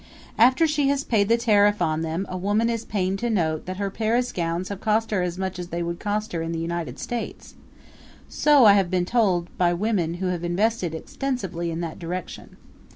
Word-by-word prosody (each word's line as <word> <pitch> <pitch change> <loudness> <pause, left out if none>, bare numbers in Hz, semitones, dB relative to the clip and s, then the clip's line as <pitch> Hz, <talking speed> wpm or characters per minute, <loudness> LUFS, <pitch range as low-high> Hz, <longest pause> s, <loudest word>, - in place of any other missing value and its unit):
After 260 +7 +5
she 300 -3 +1
has 280 0 +1
paid 205 -3 +1
the 230 - +5
tariff 210 -3 +3
on 160 -2 0
them 165 +4 -2
a 185 - -6
woman 205 +5 +1
is 230 -1 -3
pained 195 -1 -1
to 240 - -1
note 160 -8 0
that 185 0 -4
her 200 -1 -2
Paris 230 +4 0
gowns 170 +1 -2
have 200 -1 -6
cost 220 +1 +1
her 200 -3 +1
as 180 0 -2
much 190 -1 -3
as 175 - -5
they 170 0 -3
would 170 0 -4
cost 210 +1 -2
her 165 - -2
in 165 0 -3
the - - -3
United 170 0 -4
States 240 -1 -5 0.7
so 290 -5 +4
I 205 - +9
have 195 -3 +2
been 180 -1 +1
told 185 -6 +1
by 175 -1 +3
women 180 -4 0
who 185 +2 -4
have 175 -1 -3
invested 180 0 0
extensively 190 -5 -3
in 165 +1 -3
that 165 -2 -5
direction. 180 +2 -6
190 Hz, 215 wpm, -24 LUFS, 175-225 Hz, 0.7 s, I